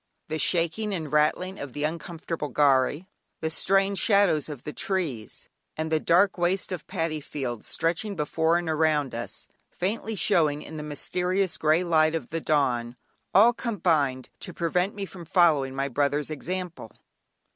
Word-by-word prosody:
The 155 0 -2
shaking 185 +6 +1
and 160 -4 -5
rattling 155 +5 +1
of 140 -3 -7
the 145 - -3
uncomfortable 165 0 -4
"gharry," 145 +3 +2 0.4
the 160 0 -1
strange 195 +3 +2
shadows 200 -8 +3
of 145 -5 -7
the 150 - -6
trees, 155 - -2 0.3
and 160 0 -2
the 160 - +3
dark 180 +4 +3
waste 185 +3 +1
of 180 -4 -5
paddy 165 -4 -2
fields 130 -6 -5
stretching 175 +5 -1
before 160 +1 +1
and 175 -1 -3
around 155 -3 +1
us, 115 0 -4 0.2
faintly 215 +4 -3
showing 150 -6 +2
in 160 - -9
the - - -4
mysterious 180 +5 -1
grey 155 +3 +2
light 160 -2 +3
of 155 -7 -4
the 165 0 -2
dawn, 125 -6 +1 0.4
all 225 +5 +7
combined 160 - 0
to 180 - -8
prevent 180 +3 0
me 200 -1 -4
from 185 -2 -10
following 160 -6 +3
my 135 0 -1
brother's 145 +3 0
example. 175 -4 -5
160 Hz, 155 wpm, -26 LUFS, 150-180 Hz, 0.4 s, all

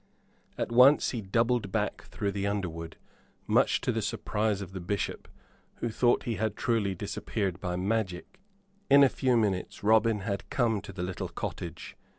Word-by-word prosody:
At - - -2
once 130 +5 +6
he 120 - -3
doubled 115 +1 +1
back - - -2
through 100 - -3
the 100 0 -2
underwood, 85 -5 -4 0.5
much - - +3
to - - 0
the - - -1
surprise 105 -1 -1
of 95 -2 -7
the 95 - -6
Bishop, 100 +3 -3 0.5
who 120 - -3
thought 120 +2 +2
he 115 -2 -2
had 110 -1 -1
truly 110 -5 0
disappeared 95 +1 -3
by 90 0 -3
magic. 95 - -2 0.5
In 140 0 +8
a 135 - +6
few 125 -2 +1
minutes 100 -5 -1
Robin 110 0 +4
had 100 -1 -4
come 115 -6 +1
to - - -9
the 90 - -5
little 90 0 -4
cottage. - - -6
105 Hz, 165 wpm, -29 LUFS, 95-115 Hz, 0.5 s, In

